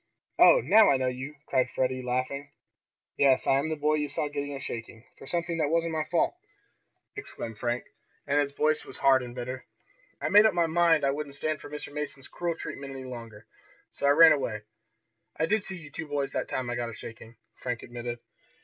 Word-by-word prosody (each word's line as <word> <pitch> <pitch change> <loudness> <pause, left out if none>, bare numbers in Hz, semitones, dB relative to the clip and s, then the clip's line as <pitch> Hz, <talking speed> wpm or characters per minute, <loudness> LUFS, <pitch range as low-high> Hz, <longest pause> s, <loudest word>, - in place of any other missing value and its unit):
"Oh, - - +8
now 220 - +6
I 135 - +4
know 130 - -1
you!" 130 +4 -4
cried 130 -2 +1
Freddie, 130 0 -1
laughing. 130 +3 -2 0.7
"Yes, 135 -2 +4
I 135 - +4
am 150 +3 -2
the 160 - -1
boy 150 +1 +1
you 150 -1 -2
saw 145 +1 -1
getting 145 -1 -4
a - - -5
shaking, 115 -2 -7
for 135 - -13
something 170 0 -2
that 150 -2 +1
wasn't 165 0 +1
my 155 -1 -1
fault!" 170 - +1 0.8
exclaimed 115 - -6
Frank, 120 0 -1 0.4
and 145 +1 +2
his 145 -1 +1
voice 155 +2 +1
was - - -10
hard 135 -1 +5
and 120 -1 -8
bitter. 130 +1 -5 0.6
"I - - -1
made 210 +2 +8
up 215 - -1
my 170 -1 +3
mind 165 -1 +3
I 135 - +3
wouldn't 140 0 -5
stand 155 +1 -2
Mr. 150 0 -8
Mason's 145 -2 -5
cruel 170 -1 -2
treatment 140 -3 -7
any 130 -1 -7
longer, 115 -4 -9 0.5
so 140 - -1
I 145 +1 +4
ran 165 -1 +10
away. 115 -8 0 0.7
I 160 - +2
did 210 +4 +1
see 190 - -6
you 150 -4 -12
two 160 +2 -6
boys 145 -2 -2
that - - -2
time 125 -2 -3
I - - -2
got 120 -1 -2
a - - -8
shaking," 115 +1 -10 0.2
Frank 125 -2 -4
admitted. 120 0 -5
140 Hz, 210 wpm, -28 LUFS, 125-155 Hz, 0.8 s, ran